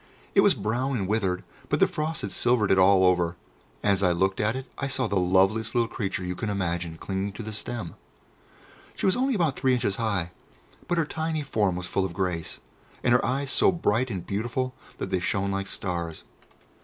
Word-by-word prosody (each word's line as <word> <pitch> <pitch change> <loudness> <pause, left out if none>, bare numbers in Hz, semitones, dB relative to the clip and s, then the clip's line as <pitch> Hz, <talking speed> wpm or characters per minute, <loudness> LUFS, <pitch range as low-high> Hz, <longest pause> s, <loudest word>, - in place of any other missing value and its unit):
It - - +6
was - - +5
brown 125 +6 -1
and 95 -4 -2
withered, 95 -3 0 0.3
but - - +1
the - - +7
frost 155 +1 -2
had 100 - -3
silvered 120 -4 +2
it 95 - +5
all 95 0 +6
over, 90 -1 +2 0.5
and 105 - +4
as 100 - +1
I 90 -2 +4
looked 95 +2 +1
at 110 +3 +1
it 130 0 -4
I 135 - -1
saw 130 -1 0
the 100 - -1
loveliest 95 +6 +2
little 120 -1 +3
creature 95 -4 -3
you 90 0 -2
can 105 +4 -3
imagine 85 -4 -2
clinging 95 +2 -3
to 115 - -7
the 110 0 -5
stem. 110 -4 -4 1.0
She - - -2
was 190 - +4
only 260 +1 +1
about 165 -8 +1
three 130 -1 +2
inches 105 -5 -1
high, 100 -7 -1 0.6
but 175 - 0
her 165 - +2
tiny 160 0 -2
form 105 -9 +1
was 90 0 -4
full 95 - 0
of 95 -3 -3
grace, 90 -4 -2 0.4
and 120 - +4
her 125 - +4
eyes 135 +1 0
so - - +4
bright 130 - +1
and 95 -6 -4
beautiful 120 +5 -2 0.2
that 95 - -4
they 95 - +2
shone 100 +2 0
like 100 0 -2
stars. 85 -4 -4
100 Hz, 210 wpm, -26 LUFS, 95-125 Hz, 1.0 s, the